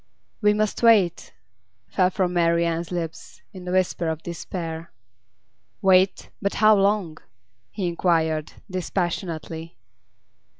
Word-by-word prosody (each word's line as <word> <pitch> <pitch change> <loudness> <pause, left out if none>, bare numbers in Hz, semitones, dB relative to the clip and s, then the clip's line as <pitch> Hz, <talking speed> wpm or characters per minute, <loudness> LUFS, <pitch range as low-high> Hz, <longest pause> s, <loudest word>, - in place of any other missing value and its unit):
'We 210 0 +4
must 215 -1 -1
wait,' 215 -7 +4 0.6
fell 180 - +2
from 185 -2 -1
Marian's 170 -1 +1
lips, 165 -2 -6
in 185 -2 -10
the 180 - -4
whisper 180 -2 +1
of 160 0 -3
despair. 165 -1 -6 0.9
'Wait? 190 0 +3
But 200 -1 -1
how 215 0 +6
long?' 195 -5 +1 0.5
he 195 - -4
inquired, 165 -3 0
dispassionately. 170 - -4
175 Hz, 110 wpm, -24 LUFS, 165-190 Hz, 0.9 s, how